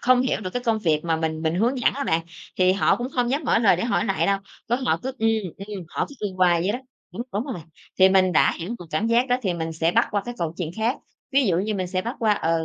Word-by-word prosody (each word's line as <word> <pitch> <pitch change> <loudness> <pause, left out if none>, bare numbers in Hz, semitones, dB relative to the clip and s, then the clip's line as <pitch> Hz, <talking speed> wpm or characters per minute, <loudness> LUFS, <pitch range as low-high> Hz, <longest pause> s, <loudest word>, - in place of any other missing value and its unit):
không 255 0 +4
hiểu 260 - 0
được 185 -3 -4
cái 245 - -2
công 225 -2 +1
việc 160 -6 +1
mà 165 -1 +1
mình 160 0 -2
mình 160 0 0
hướng 235 +8 +1
dẫn 245 - +3
đó 280 - -3
bạn, 160 +1 +2 0.4
thì 185 0 +5
họ 195 - +3
cũng 245 +1 -4
không 245 -1 +1
dám 280 +4 0
mở - - +3
lời 215 -6 +4
để 180 - -2
hỏi 220 -4 +1
lại 195 - 0
đâu. 200 0 +2 0.3
Có 240 - +2
họ 255 -1 0
cứ: 265 +1 -3
"Ừm, 225 0 +2 0.4
ừm", 200 -4 -6
họ - - -2
cứ 285 - -12
ừm 185 - -11
hoài 175 -2 +4
vậy 190 +4 0
đó, 245 - -2 0.3
đúng 225 - -4
đúng 205 +4 -1
rồi. 250 - -5 0.4
Thì 190 0 +7
mình 190 -1 +4
đã - - +4
hiểu 170 +1 -5
được 175 - -10
cảm 155 +9 0
giác 240 +3 +2
đó 245 - +3
thì 185 -5 0
mình 165 -1 -3
sẽ 160 +1 +1
bắt 230 +4 +3
qua 205 -2 0
cái 240 0 -5
câu 165 -1 -2
chuyện 170 -4 -3
khác. 225 +4 0 0.4
Ví 275 0 +4
dụ 175 -4 +2
như 210 +3 -1
mình 185 -2 -2
sẽ 185 +1 -2
bắt 235 +5 -4
qua, 220 -4 +3
ờ: 165 -4 0
200 Hz, 300 wpm, -24 LUFS, 175-240 Hz, 0.4 s, Thì